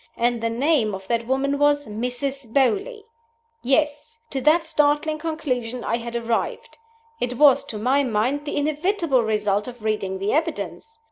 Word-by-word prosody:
And 240 0 +1
the 230 - 0
name 235 -3 +1
of 190 0 -10
that 235 -1 0
woman 275 +2 0
was 290 0 +3
Mrs. 245 +3 -3
Beauly! 405 - +1 0.6
Yes! 295 - 0
To 270 - -2
that 320 +4 +4
startling 305 0 +1
conclusion 255 -7 -3
I 230 - 0
had 235 0 -7
arrived. 235 - -2 0.4
It 245 0 -2
was, 285 -2 +6
to 215 - -5
my 255 +6 +2
mind, 255 +4 0
the 295 - -3
inevitable 305 - +1
result 210 -1 0
of 240 -3 -9
reading 205 -3 -1
the 195 +2 -1
evidence. 455 +8 -3
265 Hz, 155 wpm, -23 LUFS, 230-300 Hz, 0.6 s, was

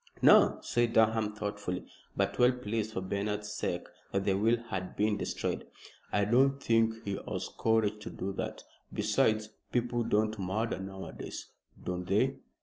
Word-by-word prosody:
"No," - - +7
said 120 -1 +1
Durham, 110 -1 +3
thoughtfully, 105 -3 -3 0.3
but - - 0
well 125 +1 +7
pleased 110 -2 -3
for 95 - -2
Bernard's 105 +2 -2
sake 90 -3 -2 0.3
that 100 0 0
the 100 - +3
will 110 +5 +3
had 95 -6 -5
been 105 0 +2
destroyed. 105 - -3 0.4
"I 100 -1 +2
don't 135 +5 +4
think 115 -2 +2
he 100 -1 -2
has - - -3
courage 110 -2 +2
to - - -6
do 95 +1 -4
that. - - -4 0.3
Besides, 110 0 +2 0.2
people 120 -1 +1
don't 110 -1 +1
murder 100 +4 -1
nowadays." 95 0 -7 0.4
"Don't 90 0 -3
they?" 130 +8 +2
105 Hz, 150 wpm, -31 LUFS, 100-115 Hz, 0.4 s, No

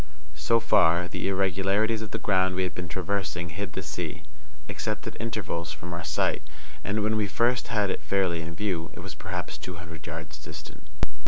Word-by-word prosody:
So 75 +10 +3
far, 85 -6 +5
the - - -2
irregularities 95 +3 +3
of 110 - -4
the - - -1
ground 95 -2 +3
we 95 - +2
had 90 - -1
been 90 0 -4
traversing 90 -1 -1
hid 90 +2 -4
the 95 - -3
sea, 85 -2 -3 0.4
except - - -2
at - - -4
intervals, 105 -7 -2
from 85 0 -6
our 85 +1 -3
sight, 75 -2 +2 0.4
and, 105 +1 +1
when 110 +1 +3
we 105 -1 +2
first 120 +4 +3
had 105 -4 +2
it - - -2
fairly 85 +1 +2
in 85 0 -5
view, 90 -5 0
it - - -6
was - - -6
perhaps - - -4
two 90 - -5
hundred 85 -2 -8
yards 75 -1 -5
distant. 75 0 -9
90 Hz, 190 wpm, -28 LUFS, 85-100 Hz, 0.4 s, far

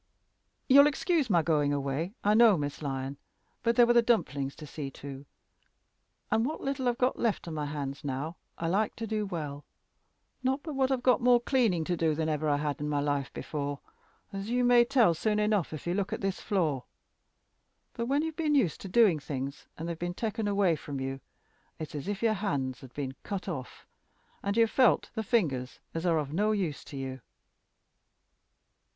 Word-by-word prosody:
"You'll 280 +2 +8
excuse 300 -2 +1
my 170 -5 +4
going 150 -3 +2
away, 145 - -2
I 210 - +4
know, 220 -3 +6
Miss 145 0 -4
Lyon. 135 -1 -3 0.4
But 235 0 +2
there 240 - +7
were 240 - +4
the 240 - +6
dumplings 145 - 0
to 155 - -9
see 145 -1 -6
to, 140 0 -9 1.0
and 225 - +3
what 300 +6 -2
little 270 -2 -1
I've 240 - -1
got 255 0 +1
left 225 -6 0
on 165 - -4
my 150 -1 -2
hands 145 0 -5
now 145 +4 -3 0.2
I 165 - -2
like 205 +5 +1
to 230 - -4
do 215 -1 -2
well. 150 -6 -5 0.8
Not 265 +2 0
but 310 - -5
what 265 -1 +1
I've 255 -2 -1 0.2
more 245 0 +5
cleaning 235 - +2
to 175 +2 -1
do 160 -2 +1
than 160 0 -1
ever 155 0 0
I 145 - +3
had 145 -1 -2
in 150 - -2
my 145 -1 +1
life 145 -1 -1
before, 145 -2 -4 0.5
as 195 +2 -4
you 245 +1 +2
may 245 -1 +6
tell 235 -9 +4
soon 210 +6 0
enough 210 -4 +1
if 155 - -7
you 175 - 0
look 195 0 -1
at - - -3
this 195 -1 -2
floor. 155 -10 0 1.1
But 235 0 -3
when 280 +3 +2
you've 320 -1 -3
been 310 -2 +1
used 200 - +2
to 195 - -7
doing 195 -6 +5
things, 140 -1 -5
and 165 - -5
they've 170 -1 -4
been 175 0 -3
taken 220 0 -2
away 200 -5 +2
from 140 -2 -6
you, 135 0 -4 0.6
it's 155 - -7
as 150 +3 -5
if 205 +1 -3
your 225 -1 +4
hands 140 - -2
had 130 - -12
been 135 -2 -3
cut 200 -2 -5
off, 135 -9 -6 0.6
and 200 +2 -1
you 230 - +6
felt 250 +2 +3
the 220 - -2
fingers 150 - 0
as 165 +2 -2
are 165 -2 +3
of 150 -2 -2
no 210 +5 +2
use 180 -8 -2
to 140 - -8
you." 130 -1 -5
175 Hz, 200 wpm, -29 LUFS, 145-230 Hz, 1.1 s, You'll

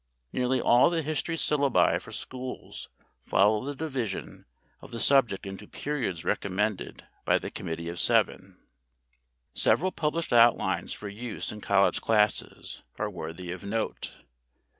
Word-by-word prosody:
Nearly 130 +1 +1
all 120 +4 +5
the 165 -2 -1
history 155 +2 -1
syllabi 145 -4 +2
for - - -12
schools 130 0 -7 0.4
follow 105 +3 +3
the 145 +2 -4
division 135 -9 -4 0.4
of - - -12
the 115 - -6
subject 125 -7 +3
into 95 0 -8
periods 125 - -3
recommended 100 +1 -1 0.2
by - - +3
the - - -6
Committee 85 0 -5
of 85 +1 -4
Seven. - - +2 1.0
Several 185 +3 +2
published 160 -3 -1
outlines 120 0 +4
for 105 - -6
use 110 +3 -5
in 105 - -9
college 100 -1 +3
classes 105 -1 0 0.2
are 105 -1 -2
worthy 85 0 -6
of 95 - -7
note. 110 +3 -3
115 Hz, 135 wpm, -28 LUFS, 100-135 Hz, 1.0 s, all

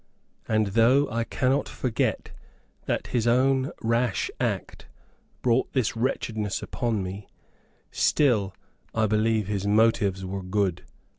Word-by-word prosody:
And 110 -1 +2
though 120 +7 +4
I 115 +1 0
cannot 130 +4 0
forget 125 -4 -2 0.6
that - - -1
his 120 -1 +1
own 130 +3 +3
rash 115 -1 0
act - - -3 0.6
brought 125 +1 +1
this 130 -5 0
wretchedness 110 -4 -2
upon 115 -5 -2
me, 95 +2 -7 0.6
still, 110 -10 +2 0.4
I 110 -1 +2
believe 110 0 +1
his 100 0 -2
motives 100 -3 +2
were 95 +1 -4
good. 90 -1 -1
110 Hz, 120 wpm, -26 LUFS, 100-120 Hz, 0.6 s, though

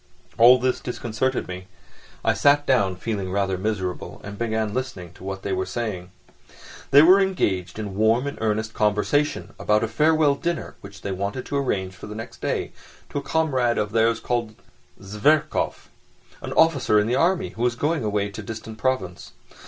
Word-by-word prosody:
All 120 +2 +8
this 125 0 0
disconcerted 125 +1 -2
me: 90 0 -7 0.6
I - - +4
sat 145 0 +3
down, 100 -9 +2
feeling 100 -1 -3
rather 95 -1 0
miserable, 95 -2 -3
and 100 0 -7
began 110 -1 -1
listening 125 -10 -5
to - - -15
what 95 0 -5
they 100 - -2
were 95 0 -1
saying. 100 -7 -4 0.8
They 145 +2 +8
were 185 +4 +7
engaged 95 - -1
in 105 -3 -5
warm 110 +5 +3
and 140 - -4
earnest 110 0 -1
conversation 105 +8 0
about 105 +1 +2
a - - +1
farewell 150 +5 +3
dinner 170 +3 -3
which 100 +1 -12
they 100 - -3
wanted 100 +7 -3
to 140 - -2
arrange 95 -9 -1
for 95 - -10
the 105 - -7
next 115 +1 -9
day - - -2 0.4
to 145 - -2
a - - -6
comrade 130 -7 +1
of 105 0 -1
theirs 115 +1 +2
called 115 -3 -2 0.5
Zverkov, 105 +10 0 0.5
an - - -6
officer 145 -9 +3
in 105 - +1
the 115 - -1
army, 175 +5 +2
who 115 - -9
was 120 0 +1
going 150 +2 0
away 105 -1 0
to 100 +2 -8
a - - -11
distant 110 +1 -8
province. 100 -9 -2
110 Hz, 180 wpm, -23 LUFS, 100-130 Hz, 0.8 s, All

